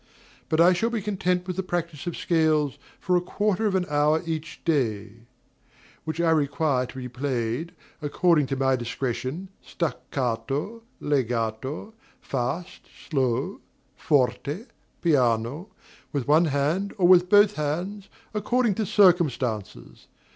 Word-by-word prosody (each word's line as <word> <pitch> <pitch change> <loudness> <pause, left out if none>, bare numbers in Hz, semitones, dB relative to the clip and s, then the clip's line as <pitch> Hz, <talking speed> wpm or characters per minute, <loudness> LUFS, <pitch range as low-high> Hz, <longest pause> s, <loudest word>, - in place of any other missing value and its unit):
But 155 - +1
I 175 +2 +7
shall 225 +6 0
be 235 -1 -1
content 185 -3 -1
with 185 -1 -4
the - - +1
practice 170 -4 -4
of 175 - -3
scales 155 -4 +1 0.2
for 180 -2 +1
a 175 - +3
quarter 210 +3 0
of 195 - 0
an 185 -1 +1
hour 150 +2 +2
each 160 0 -5
day, 115 -7 -1 0.8
which 160 +1 -4
I 170 -1 +3
require 145 -3 +1
to - - -12
be 125 -1 -5
played, 125 +3 -2 0.3
according 150 0 +2
to 135 - -2
my 135 0 +2
discretion, 130 +7 -4
staccato, 135 - -3 0.2
legato, 130 - -2 0.3
fast, 135 +7 -4 0.2
slow, 130 -5 0 0.3
forte, 145 - 0 0.4
piano, 130 - +1 0.4
with 140 -3 -2
one 155 +4 +5
hand 155 +7 0
or 180 -3 +4
with 180 0 +6
both 205 0 +6
hands, 180 +7 -3 0.2
according 230 +2 +1
to 210 - -1
circumstances. 135 - +1
155 Hz, 130 wpm, -25 LUFS, 130-180 Hz, 0.8 s, I